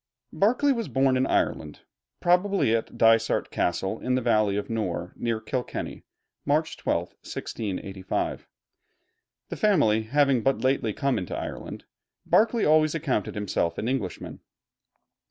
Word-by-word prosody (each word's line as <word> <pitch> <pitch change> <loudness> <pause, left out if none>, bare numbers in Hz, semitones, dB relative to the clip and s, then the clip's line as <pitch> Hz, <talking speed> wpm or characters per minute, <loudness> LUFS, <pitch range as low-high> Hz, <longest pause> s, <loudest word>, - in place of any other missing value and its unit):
] - - -36
Berkeley 255 +6 +4
was 230 -4 -3
born 135 -1 +2
in 130 +1 +1
Ireland, 75 -2 -1 0.4
probably 180 - +2
at 115 - -4
Dysart 115 0 +3
Castle 95 +5 -1
in 125 0 0
the - - +2
Valley 105 -3 +2
of 105 - -2
the - - -4
Nore, 90 -5 -3
near 115 -2 -2
Kilkenny, 125 +3 -5 0.4
March 155 +2 0
12, - - -1
1685. 95 -2 -4 1.0
The - - -5
family 145 - +3
having 135 +2 +2
but 135 +3 0
lately 130 -4 +1
come 135 +5 0
into 90 - -5
Ireland, - - -6 0.4
Berkeley 230 +1 +3
always 155 0 +4
accounted 140 - -1
himself 95 -5 -1
an 110 - -2
Englishman. 125 -8 -3
125 Hz, 135 wpm, -26 LUFS, 105-150 Hz, 1.0 s, Berkeley